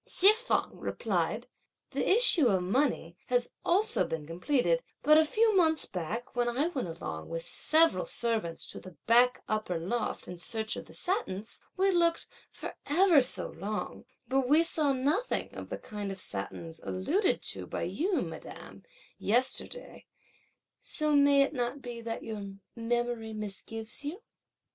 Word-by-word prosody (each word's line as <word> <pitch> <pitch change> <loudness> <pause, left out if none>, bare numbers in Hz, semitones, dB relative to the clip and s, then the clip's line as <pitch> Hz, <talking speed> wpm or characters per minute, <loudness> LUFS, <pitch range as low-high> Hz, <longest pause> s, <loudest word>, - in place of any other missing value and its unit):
Hsi 395 +3 +5
feng 480 +3 -2
replied: - - -2 0.4
"The - - -1
issue 410 - +6
of 215 - +3
the 185 - 0
money 225 - 0
has 245 -1 +1
also 425 +6 +2
been 160 -2 -4
completed; 250 - +1 0.2
but 305 +1 +7
a - - +6
few 435 +7 +2
moments 320 -4 +3
back, 205 +8 -5
when 240 0 +1
I 275 +8 0
went 265 - -3
along 80 - -6
with 165 0 -4
several 325 - +3
servants 225 - -2
to - - -8
the 185 -4 -13
back 245 +2 +4
upper 215 -5 -1
loft, 220 +8 -3
in 180 -1 -8
search 220 +2 -1
of - - -8
the - - -12
satins, 230 - -2 0.2
we 385 +1 +3
looked 340 -2 +2 0.3
for - - -8
ever 335 -1 +5
so 255 - +2
long, 210 +1 -5 0.2
but 265 -1 +1
we 310 +3 +6
saw 310 -3 +3
nothing 290 - 0
of - - -8
the - - -4
kind 205 -2 -6
of 195 - -7
satins 160 - -2
alluded 330 - 0
to - - -7
by - - -4
you, 370 +3 0
madame, - - -9 0.4
yesterday; 255 - 0 0.7
so 305 -1 +1
may 280 -1 +6
it 275 - -2
not 245 +1 -2
be 240 -3 -7
that 230 0 -5
your 205 -3 -6 0.2
memory 235 -1 -2
misgives 215 +3 -6
you?" 305 +7 -5
245 Hz, 160 wpm, -30 LUFS, 210-320 Hz, 0.7 s, but